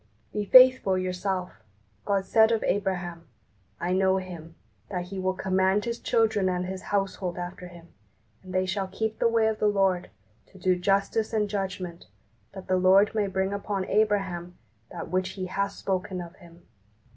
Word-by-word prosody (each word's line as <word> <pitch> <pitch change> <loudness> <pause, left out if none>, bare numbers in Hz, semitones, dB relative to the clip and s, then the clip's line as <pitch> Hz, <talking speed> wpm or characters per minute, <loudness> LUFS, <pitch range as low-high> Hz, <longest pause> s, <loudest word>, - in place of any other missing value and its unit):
Be 210 -1 -2
faithful 255 -5 +7
yourself. 185 0 -3 0.5
God 195 -1 0
said 220 +2 +4
of 225 - +1
Abraham, 180 -4 -2 0.5
"I 175 +1 -1
know 190 0 +3
him, 170 -3 -8 0.3
that 180 -2 -4
he 195 -1 -5
will 185 0 -1
command 190 +2 +1
his 235 0 -3
children 220 -4 +1
and 180 0 -1
his 190 0 -5
household 195 -3 -2
after 180 0 -6
him, 175 -1 -14 0.5
and 185 - -11
they 185 0 +1
shall 190 +1 -2
keep 220 +3 -3
the - - +3
way 230 -1 +2
of 220 -1 0
the 210 - +2
Lord, 195 -3 +1 0.4
to 195 - -18
do 185 0 +2
justice 200 +4 0
and 210 -1 +1
judgment, 185 -4 -5 0.5
that 190 - -9
the 185 - +2
Lord 190 +3 +5
may 210 -2 0
bring 190 +1 -1
upon 200 -1 -3
Abraham 195 -5 0 0.3
that - - -7
which 185 0 -1
He 185 - -3
hath 200 +2 -2
spoken 185 -1 -3
of 170 -1 -8
him." 170 0 -17
190 Hz, 170 wpm, -27 LUFS, 180-205 Hz, 0.5 s, faithful